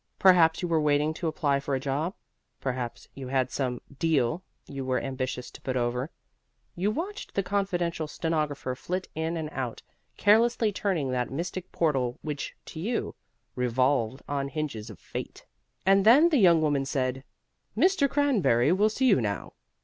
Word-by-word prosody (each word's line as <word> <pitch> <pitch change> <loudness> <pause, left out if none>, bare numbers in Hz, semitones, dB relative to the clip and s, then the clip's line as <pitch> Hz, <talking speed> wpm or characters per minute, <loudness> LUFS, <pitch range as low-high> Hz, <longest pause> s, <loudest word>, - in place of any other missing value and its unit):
Perhaps 175 -3 +5
you - - 0
were 165 -2 +2
waiting 150 +1 +2
to 165 - -3
apply 145 -3 +1
for 140 0 -2
a - - -1
job; 145 +7 -2 0.4
perhaps 125 -2 -4
you 135 -2 -7
had 130 -1 0
some 125 -3 -2 0.2
"deal" 155 -1 +1 0.2
you 135 -1 -6
were 130 -1 0
ambitious 130 -2 -4
to - - -13
put 130 -1 -2
over. 125 +3 -1 0.7
You 190 +4 0
watched 360 - -5
the 195 - +1
confidential 175 -4 -1
stenographer 150 -5 -2
flit 180 +8 -4
in 160 +1 -2
and 160 -1 -3
out, 125 -5 -4 0.3
carelessly 225 +1 +4
turning 180 -9 -1
that 125 -1 -1
mystic 170 +5 -5
portal 135 -7 0
which, 150 -2 -4
to 160 - -8
you, 225 +7 -2 0.4
revolved 125 0 +1
on 140 -1 -1
hinges 140 -6 -4
of 105 - -10
fate. - - -7 0.4
And 195 0 +5
then 270 - +7
the 300 -5 +3
young 170 -5 +5
woman 145 -3 +1
said, 130 -1 -1 0.5
"Mr. 330 - +4
Cranberry 210 - +3
will 205 +4 +4
see 255 +5 0
you 205 - +5
now." 100 -4 -3
155 Hz, 165 wpm, -27 LUFS, 130-185 Hz, 0.7 s, then